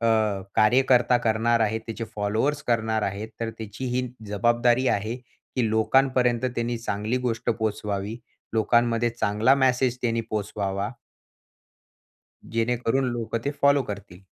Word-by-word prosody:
अ, 115 - +1 0.5
कार्यकर्ता 125 +2 +4
करणार 115 +1 +2
आहे. 110 +1 +1
त्याचे 115 0 -6
फॉलोवर्स 110 +8 0
करणार 110 -2 +1
आहेत. 100 +2 -3
तर 115 - -1
त्याची 110 +3 -6
ही 125 0 0 0.2
जबाबदारी 120 +4 +2
आहे 110 +4 -1
की 125 -1 -5
लोकांपर्यंत 125 +2 +2
त्यांनी 120 0 -1
चांगली 110 +1 -2
गोष्ट 115 0 -1
पोहोचवावी. 105 -1 -2 0.4
लोकांमध्ये 120 +1 +2
चांगला 115 +3 +2
मेसेज 130 -2 +2
त्यांनी 115 -1 +1
पोहचवावा. 100 0 -2 1.6
जेणेकरून 120 +3 +1
लोकं 115 -1 -2
ते 140 - 0
फॉलो 140 0 +5
करतील. 100 -5 -8
115 Hz, 120 wpm, -25 LUFS, 110-125 Hz, 1.6 s, फॉलो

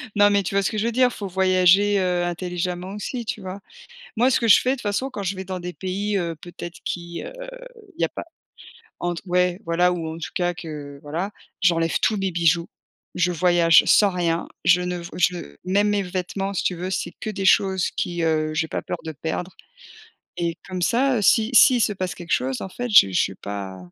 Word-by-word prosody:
Non, 205 0 +6
mais 200 -1 +2
tu 190 - -4
vois 200 - +4
ce - - +1
que 215 - -4
je 210 - 0
veux 235 - +1
dire, 250 +1 +4
il - - -10
faut 200 - -5
voyager, 190 +2 +4
heu, 180 -1 0
intelligemment 180 +1 -3
aussi, 230 +4 -5
tu 215 - -4
vois? 190 +1 -7 0.6
Moi, 245 +3 +4
ce 260 - +2
que 230 - 0
je - - +8
fais, 255 - 0
de - - +1
toute 255 - -10
façon, 210 +6 -1
quand 205 -6 -6
je 195 +1 -2
vais 190 - -6
dans 185 0 -5
des 180 0 -5
pays, 200 +3 -2
heu, 170 -2 -2
peut-être 175 +1 -9
qui, 170 -1 -5
heu, - - -7 0.7
il - - -5
y - - +3
a - - -4
pas, - - -7 0.7
entre 175 -1 -3
ouais, 180 0 +1
voilà, 175 +2 +2
ou 170 -2 -3
en - - -9
tout 165 - -6
cas 175 -1 0
que 145 -3 -8
voilà, 170 +7 -3 0.3
j'enlève 165 -3 +2
tous 215 - +2
mes 195 -1 -1
bijoux. 170 0 +2 0.5
Je 180 0 +1
voyage 170 -1 +5
sans 205 - +5
rien, 170 -2 -1 0.2
je 180 -1 +5
ne 180 0 -3
v 170 - -8
je 175 - -1
même 200 +3 +2
mes 205 -1 +1
vêtements 190 +1 -3
si 190 - -1
tu 180 - 0
veux 180 +2 -4
c'est 190 - -3
que - - -4
des 200 -2 -4
choses 190 -1 +3
qui, 175 -1 -3
heu, 155 -1 +1
j'ai 160 +1 0
pas - - -3
peur 180 - -4
de 160 - -3
perdre 160 +4 -4 0.9
et 170 -1 -2
comme 185 -1 -4
ça, 245 +5 +2
si 220 +3 +3
s'il 250 0 +7
se 210 - +2
passe 185 -2 -3
quelque 170 -1 -4
chose, 130 0 0
en - - -4
fait, 245 +6 -5
je 205 - +8
je 90 - +2
suis 95 - -2
pas. 100 -1 -6
180 Hz, 230 wpm, -23 LUFS, 170-200 Hz, 0.9 s, je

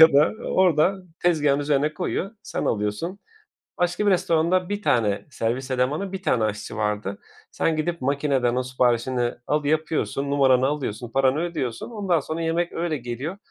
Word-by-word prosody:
ya 160 0 +9
da 145 +2 +5 0.2
orada 185 0 +3 0.3
tezgâhın 150 -5 +3
üzerine 145 +1 +1
koyuyor, 190 +2 -2
sen - - -3
alıyorsun. 105 - -2 0.6
Başka 180 +4 0
bir 205 - +5
restoranda 175 0 +2
1 205 0 -2
tane 105 - +1
servis 130 +1 -2
elemanı, 140 +10 0
1 190 -1 -5
tane 120 -9 +2
aşçı 105 -1 -3
vardı. 105 -2 -2 0.3
Sen 165 - 0
gidip 170 +1 -2
makineden 135 -3 +1
o 130 - 0
siparişini 125 -1 +1
alı 150 -1 0
yapıyorsun, 155 -2 0
numaranı 130 -2 +4
alıyorsun, 125 -6 -3
paranı 135 +2 +2
ödüyorsun 155 -9 -3
ondan 195 -7 +1
sonra 155 +3 -4
yemek 165 +1 0
öyle 165 -2 -1
geliyor. 130 +9 -5
145 Hz, 155 wpm, -24 LUFS, 125-170 Hz, 0.6 s, ya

